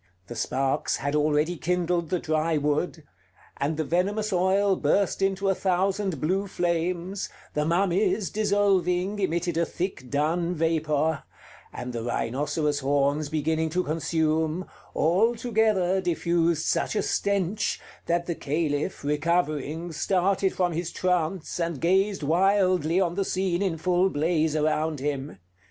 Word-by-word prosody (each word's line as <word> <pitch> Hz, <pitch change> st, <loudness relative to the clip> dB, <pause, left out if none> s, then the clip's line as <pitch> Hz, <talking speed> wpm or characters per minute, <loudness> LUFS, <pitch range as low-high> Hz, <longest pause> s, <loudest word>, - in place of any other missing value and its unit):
The 120 Hz, -, -8 dB
sparks 135 Hz, +3 st, 0 dB
had 145 Hz, +1 st, -2 dB
already 150 Hz, +3 st, +1 dB
kindled 175 Hz, -1 st, 0 dB
the 180 Hz, -, +1 dB
dry 155 Hz, 0 st, 0 dB
wood; 150 Hz, +2 st, -1 dB, 0.6 s
the 155 Hz, +2 st, 0 dB
venomous 200 Hz, +6 st, 0 dB
oil 190 Hz, +2 st, +3 dB
burst 195 Hz, +1 st, +1 dB
into 195 Hz, 0 st, +1 dB
a 195 Hz, -, +4 dB
thousand 190 Hz, -2 st, 0 dB
blue 190 Hz, +7 st, 0 dB
flames; 175 Hz, +1 st, -2 dB, 0.2 s
the 150 Hz, 0 st, 0 dB
mummies, 190 Hz, +4 st, +1 dB
dissolving, 200 Hz, -2 st, +1 dB
emitted 175 Hz, -2 st, -1 dB
a 170 Hz, -, +3 dB
thick 175 Hz, -8 st, -4 dB
dun 165 Hz, +5 st, 0 dB
vapor; 160 Hz, -1 st, +1 dB, 0.5 s
and 125 Hz, 0 st, -6 dB
the 115 Hz, -, -3 dB
rhinoceros' 145 Hz, +5 st, -1 dB
horns 145 Hz, +2 st, +1 dB
beginning 160 Hz, +1 st, 0 dB
to 180 Hz, +3 st, 0 dB
consume, 160 Hz, +2 st, 0 dB, 0.3 s
all 200 Hz, +9 st, +3 dB
together 215 Hz, -5 st, +1 dB
diffused 170 Hz, -2 st, +1 dB
such -, -, 0 dB
a -, -, +1 dB
stench, 200 Hz, 0 st, 0 dB, 0.3 s
that 170 Hz, 0 st, +1 dB
the 170 Hz, -, -1 dB
Caliph, 150 Hz, -1 st, -2 dB
recovering, 155 Hz, +1 st, -1 dB
started 190 Hz, +3 st, +1 dB
from 180 Hz, -1 st, 0 dB
his 170 Hz, +1 st, -3 dB
trance 180 Hz, -1 st, -1 dB
and 170 Hz, -4 st, -2 dB
gazed 190 Hz, +2 st, +2 dB
wildly 185 Hz, 0 st, +3 dB
on 175 Hz, -3 st, +1 dB
the 195 Hz, +2 st, 0 dB
scene 185 Hz, -1 st, -1 dB
in 185 Hz, -5 st, 0 dB
full 180 Hz, +3 st, +2 dB
blaze 155 Hz, -1 st, +1 dB
around 155 Hz, 0 st, 0 dB
him. 140 Hz, 0 st, -3 dB
170 Hz, 135 wpm, -26 LUFS, 155-190 Hz, 0.6 s, a